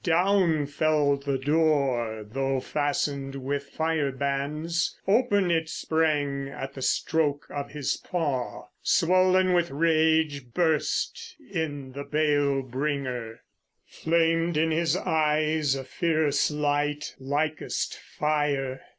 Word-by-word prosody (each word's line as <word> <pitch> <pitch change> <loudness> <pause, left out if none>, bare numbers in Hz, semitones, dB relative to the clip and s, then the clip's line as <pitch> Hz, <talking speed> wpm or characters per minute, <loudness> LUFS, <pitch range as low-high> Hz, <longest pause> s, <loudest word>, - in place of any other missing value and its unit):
Down 175 -3 +3
fell 145 0 +2
the 140 -1 -2
door, 135 -7 +1
though 135 +3 -1
fastened 140 -1 -2
with 140 +1 -3
fire 160 -3 0
bands; 140 +5 -2
Open 205 -4 +3
it 160 -1 0
sprang 145 -5 0
at 135 0 -6
the 135 - -8
stroke 150 +1 0
of 140 -1 -4
his 145 -2 -2
paw. 145 -8 -3 0.2
Swollen 185 +1 +3
with 175 -1 +2
rage 155 -4 +1
burst 175 - 0 0.2
in 145 -6 -3
the 140 +2 -6
bale 145 -2 +1
bringer; 130 -3 -3 0.4
Flamed 165 0 +1
in 160 +1 +2
his 165 +1 +1
eyes 155 -2 +1
a 135 - -4
fierce 155 0 +1
light, 150 0 -1
likest 145 +3 -2
fire. 145 -3 -1
150 Hz, 110 wpm, -26 LUFS, 140-160 Hz, 0.4 s, Down